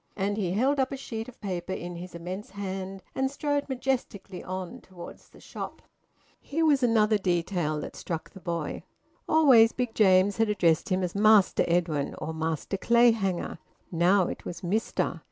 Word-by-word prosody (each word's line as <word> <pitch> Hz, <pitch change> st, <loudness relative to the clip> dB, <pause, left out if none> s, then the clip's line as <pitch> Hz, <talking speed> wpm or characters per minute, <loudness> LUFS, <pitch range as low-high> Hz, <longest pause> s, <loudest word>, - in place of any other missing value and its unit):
And 200 Hz, +1 st, -1 dB
he 185 Hz, -4 st, -1 dB
held 270 Hz, +7 st, +2 dB
up 265 Hz, 0 st, +1 dB
a 275 Hz, -, -4 dB
sheet 225 Hz, -3 st, -6 dB
of 250 Hz, -, -16 dB
paper 185 Hz, -3 st, -4 dB
in 175 Hz, -1 st, -6 dB
his 180 Hz, 0 st, -9 dB
immense 180 Hz, +5 st, -6 dB
hand, 190 Hz, -1 st, -6 dB
and 265 Hz, 0 st, 0 dB
strode 290 Hz, 0 st, -2 dB
majestically 245 Hz, -8 st, -3 dB
on 185 Hz, -1 st, -6 dB
towards 180 Hz, -2 st, -12 dB
the -, -, -18 dB
shop. -, -, -7 dB, 0.6 s
Here 320 Hz, +3 st, -1 dB
was 290 Hz, -3 st, +4 dB
another 220 Hz, -3 st, +3 dB
detail 175 Hz, -4 st, -1 dB
that -, -, -7 dB
struck 165 Hz, -2 st, -5 dB
the 190 Hz, -, -12 dB
boy. 170 Hz, -3 st, -4 dB, 0.5 s
Always 260 Hz, -8 st, +6 dB
Big 245 Hz, -3 st, -2 dB
James 195 Hz, -1 st, +4 dB
had 225 Hz, -1 st, +2 dB
addressed 175 Hz, -2 st, +2 dB
him 185 Hz, 0 st, +1 dB
as 180 Hz, -, -2 dB
`Master 210 Hz, -1 st, +5 dB
Edwin' 165 Hz, -4 st, 0 dB
or 160 Hz, -, -5 dB
`Master 160 Hz, +4 st, -3 dB
Clayhanger.' 225 Hz, -8 st, +2 dB, 0.3 s
Now 180 Hz, +3 st, +3 dB
it -, -, -6 dB
was 175 Hz, -, -7 dB
`Mister.' 205 Hz, +5 st, -1 dB
195 Hz, 170 wpm, -27 LUFS, 175-230 Hz, 0.6 s, Always